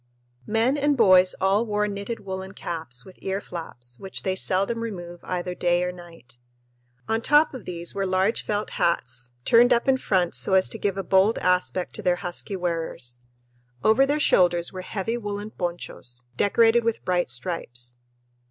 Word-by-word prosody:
Men 230 +6 +2
and 290 0 +2
boys 185 -5 +6
all 195 +3 +3
wore 210 -2 0
knitted 200 +3 -5
woolen 190 -1 -6
caps, 160 -10 -4
with 185 - -15
ear 195 +1 -2
flaps, 125 -10 -6
which 190 -1 -6
they 190 -1 0
seldom 195 +5 +1
remove 175 -6 -6
either 180 0 -3
day 175 0 +1
or 180 - -1
night. 165 -9 -14 0.7
On 225 +1 0
top 295 +5 +4
of 255 - -8
these 170 -1 -3
were 195 -1 -1
large 190 +4 +2
felt 210 0 -2
hats, 120 -7 -1
turned 240 +2 +6
up 240 +1 +3
in 265 -1 +4
front 185 -8 0
so 190 - +2
as 190 - +4
to 225 - -6
give 200 -1 -1
a 195 - -2
bold 190 +4 +3
aspect 180 0 0
to - - -6
their 180 -1 +2
husky 180 +2 -5
wearers. 165 -9 -2 0.6
Over 240 +5 +4
their 290 +2 +1
shoulders 175 - +3
were 185 - -5
heavy 215 +5 -3
woolen 205 0 -5
ponchos, 170 - -6
decorated 230 - +4
with 230 -1 -2
bright 180 -4 +1
stripes. 125 -3 -2
190 Hz, 170 wpm, -25 LUFS, 175-215 Hz, 0.7 s, boys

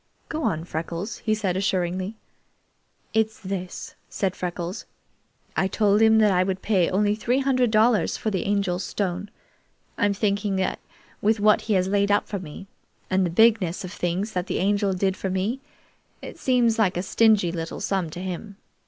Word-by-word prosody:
"Go 315 - -3
on, 160 - -1
Freckles," 170 +5 -4
he 215 -2 0
said 195 -4 -1
assuringly. 185 +1 -1 1.0
"It's 220 -1 +1
this," 185 -2 -5 0.2
said 190 -2 -1
Freckles. 175 0 -5 0.7
"I 190 - +2
told 205 +1 +2
him 220 0 +6
that 215 -2 +5
I 180 -1 +3
would 190 0 -3
pay 190 -5 +2
only 205 +2 +2
three 235 +4 0
hundred 260 -3 +2
dollars 220 +1 +3
for 220 - -2
the 190 -3 -2
Angel's 200 -2 0
stone. 195 0 -3 0.7
I'm 205 0 +2
thinking 200 -1 0
that 190 0 -1 0.4
with 215 +1 +2
what 210 +1 +4
he 220 - -1
has 185 -1 +2
laid 200 +1 +1
up 205 0 +2
for 200 - -4
me, 180 +2 -9 0.5
and 190 0 +3
the 175 - 0
bigness 200 -2 +3
of 180 - -6
things 185 +5 -2
that 180 -2 -3
the - - -1
Angel 200 0 +1
did 190 +1 0
for 190 - -3
me, 195 +7 -1 0.6
it - - -10
seems 240 -3 +2
like 190 -5 +2
a 180 - -1
stingy 210 -3 +3
little 165 -1 -5
sum 190 -4 -1
to 175 +3 -7
him. 190 +2 -6
200 Hz, 180 wpm, -24 LUFS, 185-215 Hz, 1.0 s, him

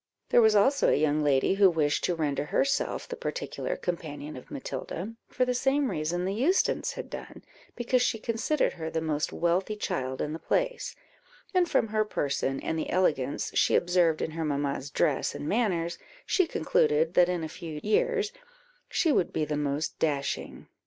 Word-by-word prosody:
There 240 - +6
was 220 -1 +5
also 270 +8 +4
a - - +4
young 150 0 +2
lady 140 +3 +3
who 195 -1 +6
wished 155 -4 +1
to 180 - 0
render 145 -3 -1
herself 275 - 0
the 485 - -5
particular - - -4
companion 155 - -5
of 125 - -11
Matilda, 165 - -5
for 255 - 0
the 250 - 0
same 270 +2 +1
reason 170 +4 -1
the 190 - -1
Eustons 290 - +1
had - - -6
done, - - -9 0.3
because 245 +1 +1
she 235 - +1
considered 230 +7 0
her 160 -1 -5
the 160 - -1
most 155 -2 -1
wealthy 180 +5 0
child 130 -10 -3
in 150 - -2
the 160 - -5
place; - - -1 0.6
and 360 -2 +3
from 225 - +2
her 215 0 +2
person, 140 -8 -1
and 160 - -2
the - - -3
elegance 150 -7 0
she - - +3
observed 175 -3 +2
in - - -3
her 165 +1 -3
mamma's 140 -2 -2
dress 145 -1 0
and 145 - -5
manners, 180 -6 0 0.3
she 370 -3 +2
concluded 155 - +2
that 180 -1 +5
in 175 -2 -1
a - - -2
few 155 -1 -7
years 430 - +1 0.6
she 325 - +2
would 180 - +2
be 155 - 0
the 150 0 -2
most 145 +1 -2
dashing. 140 -3 -2
170 Hz, 180 wpm, -28 LUFS, 150-230 Hz, 0.6 s, There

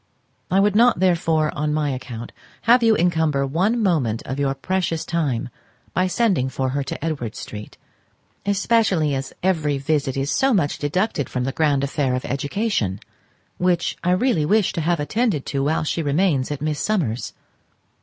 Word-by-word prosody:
I 190 - +3
would 205 0 +3
not, 235 -3 +5
therefore, 165 -4 +2
on 150 +1 -1
my 150 -2 0
account, 125 -3 -6 0.3
have 240 +3 +5
you 225 -1 +4
encumber 160 -5 +1
one 195 - +1
moment 135 - +1
of 130 +2 -4
your 135 -1 0
precious 170 +2 -1
time 140 -7 -1 0.4
by 185 +1 +2
sending 185 - +1
for 130 0 -2
her 140 +2 -1
to 145 - -5
Edward 140 -9 -3
Street, 105 0 -8 0.7
especially 200 -6 +2
as 135 0 -3
every 155 -6 +1
visit 135 -1 -1
is 135 +2 -1
so 270 -3 +3
much 145 -7 0
deducted 155 - -1
from 125 - -2
the 135 - -1
grand 145 -1 +1
affair 140 -2 0
of 125 - -4
education, 140 - -1 0.6
which 180 -1 +1
I 180 - +1
really 185 -4 +2
wish 205 +5 +2
to 165 - -2
have 170 +1 +1
attended 175 - 0
to 140 -1 -1
while 155 +2 +1
she 160 +2 -1
remains 145 -2 +1
at 145 -1 -4
Miss 150 -1 -1
Summers's. 155 - -1
155 Hz, 170 wpm, -22 LUFS, 135-185 Hz, 0.7 s, not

